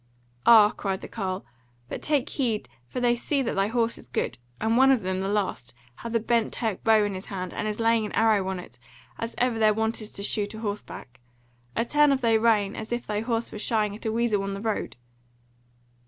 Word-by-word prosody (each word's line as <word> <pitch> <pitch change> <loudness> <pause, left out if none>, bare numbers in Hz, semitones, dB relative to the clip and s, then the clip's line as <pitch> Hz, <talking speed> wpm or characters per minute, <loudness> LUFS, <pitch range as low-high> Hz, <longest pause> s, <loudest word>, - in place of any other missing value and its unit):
"Ah," 215 -3 +8
cried 195 -1 -3
the - - -7
carle! 190 -3 -4 0.4
"but - - -6
take 295 -3 +1
heed, 235 -6 -1 0.2
for 250 - -4
they 240 -1 +3
see 275 +3 0
that 235 - -2
thy 195 +1 +2
horse 230 +1 0
is - - -13
good, 120 - -2 0.2
and 220 +1 +1
one 265 +2 +6
of 255 -6 +3
them, 185 0 -1
the 190 - -2
last, 195 - -2 0.2
hath 230 0 -5
a - - +4
bent 230 0 +1
Turk 220 -5 -2
bow 220 -1 +5
in 205 -1 -1
his 185 0 -7
hand, 185 -3 -5
and 215 - -3
is 210 +1 -3
laying 225 -1 +2
an - - -9
arrow 215 -4 +3
on 190 -1 -2
it; 120 -8 -12 0.4
as 230 +1 -4
ever 245 -2 +1
their 215 -1 +4
wont 220 +1 0
is 215 - -6
to 200 - -5
shoot 205 0 -1
a - - -7
horseback: 205 - -6 0.6
a 230 - +1
turn 295 +3 +4
of 270 -1 +1
thy 230 -2 +3
rein, 220 -3 +3
as 220 +1 -7
if 240 0 -2
thine 210 +1 -2
horse 230 -1 -1
were 215 - -7
shying 210 -2 0
at 220 - -6
a - - +1
weasel 225 -3 +1
on 195 0 -3
the - - -6
road!" 220 -1 -2
220 Hz, 230 wpm, -26 LUFS, 200-230 Hz, 0.6 s, Ah